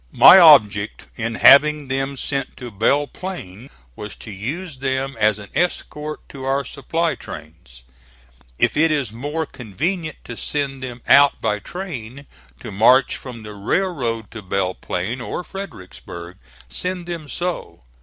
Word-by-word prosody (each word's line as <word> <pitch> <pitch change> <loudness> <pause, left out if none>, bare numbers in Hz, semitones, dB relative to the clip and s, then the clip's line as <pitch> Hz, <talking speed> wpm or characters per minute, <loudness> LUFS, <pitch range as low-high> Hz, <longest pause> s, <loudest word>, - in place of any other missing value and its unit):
My 190 - +10
object 110 - +5
in 115 -1 -3
having 150 +2 +6
them 135 +1 -2
sent 135 0 -3
to 125 -2 -8
Belle 115 +8 +2
Plain 135 - -8 0.3
was 105 - -8
to 110 - -10
use 140 - -5
them 135 0 -1
as 105 -1 +3
an 100 -2 -11
escort 155 -3 -2
to 135 -2 -9
our 135 +1 0
supply 165 +5 -1
trains. 65 -6 -11 0.7
If - - +2
it 160 +2 +4
is 140 -8 -1
more 145 +7 -3
convenient 155 - -4
to 120 - -8
send 135 +1 -3
them 125 -2 -7
out 140 0 +6
by 105 -1 0
train 140 - -7 0.4
to 110 - -7
march 120 +7 +4
from 120 -4 -9
the 105 0 -8
railroad 115 - -2
to 115 - -8
Belle 95 -1 -1
Plain 105 +10 -4
or 150 - -4
Fredericksburg, 90 - -9 0.3
send 180 -1 -4
them 165 -4 -6
so. 175 - -4
130 Hz, 145 wpm, -21 LUFS, 105-150 Hz, 0.7 s, My